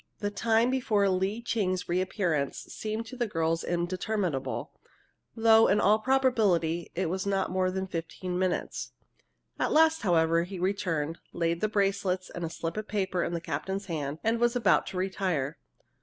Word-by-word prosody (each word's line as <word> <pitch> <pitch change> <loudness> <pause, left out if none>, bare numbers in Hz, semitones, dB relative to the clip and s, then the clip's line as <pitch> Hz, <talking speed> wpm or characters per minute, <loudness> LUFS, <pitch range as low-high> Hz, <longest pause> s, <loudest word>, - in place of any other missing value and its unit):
The 205 0 -2
time 225 +3 +2
before 220 -6 +2
Lee 190 +5 -1
Ching's 185 -6 -1
reappearance 175 -5 0
seemed 220 +1 -5
to 255 - -9
the 240 -2 -1
girls 165 -3 0
interminable, 175 -5 -2 0.6
though, 225 -1 +6
in 200 +2 +3
all 210 +2 +4
probability, 215 -10 +2
it 185 0 0
was 190 +4 -2
not 195 -2 0
more 185 0 +1
than 190 +1 -2
fifteen 180 +1 -4
minutes. 185 -1 -2 0.7
At - - +1
last, 320 +1 +4
however, 165 -3 +3
he 185 +3 -5
returned, 175 -5 -1
laid 170 0 0
the 215 - +1
bracelets 195 -2 0
and 175 - -6
a 165 - -2
slip 165 +1 -5
of 215 0 -4
paper 190 -4 -1
in 170 - -2
the 170 - -1
captain's 195 +3 -3
hand, 150 -5 -3
and 225 +1 +1
was 240 +1 +2
about 245 - +3
to 190 - -5
retire. 185 -6 -1
190 Hz, 165 wpm, -29 LUFS, 170-215 Hz, 0.7 s, though